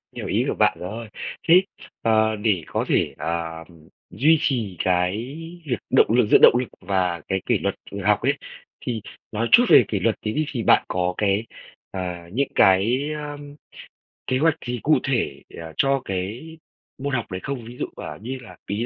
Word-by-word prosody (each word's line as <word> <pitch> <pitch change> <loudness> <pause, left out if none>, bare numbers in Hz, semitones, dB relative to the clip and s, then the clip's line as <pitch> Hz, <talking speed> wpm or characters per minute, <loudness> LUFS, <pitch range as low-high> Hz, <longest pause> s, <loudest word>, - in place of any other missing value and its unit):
hiểu - - -5
ý - - +1
của - - -1
bạn - - +3
rồi, 110 +5 -6 0.4
thế, 180 +3 +7 0.4
ờ, 110 -1 +3
để 105 -6 0
có - - -2
thể, - - +1
à, 80 -1 -3 0.5
duy 150 - +4
trì 110 -10 -1
cái 90 +2 +1 0.5
việc 125 -5 -1
động - - +5
lực 115 0 +3
giữ - - +9
động - - +8
lực 125 - -2
và 90 -4 0
cái 95 -1 -1
kỷ - - +2
luật - - -1 0.3
học 105 0 +3
ấy, 135 +4 +2 0.5
thì 115 -4 -3 0.3
nói 115 +2 -1
chút 245 - +8
về - - +8
kỷ 100 - -1
luật 110 +3 +1
tí 110 - -2
đi, 155 +3 0
thì 120 -5 -3
bạn - - +5
có 90 0 -1
cái, 105 +2 +1 0.5
à, 90 -2 -5
những 135 +4 +1
cái, 115 +10 +4
a, 150 -1 -6 0.9
kế 130 - +1
hoạch 160 +2 +3
gì 120 0 -3
cụ 150 -3 +4
thể, 120 - -1 0.2
à, 80 -1 -8
cho 135 0 +2
cái 105 - -5 0.4
môn 140 +1 -3
học 115 -6 -2
đấy 95 - -4
không? 135 -4 -4
Ví 120 +2 -10
dụ, - - -2
à, - - -7
như 130 +4 -5
là 115 - -13
ý 105 +4 -1
110 Hz, 190 wpm, -23 LUFS, 95-130 Hz, 0.9 s, giữ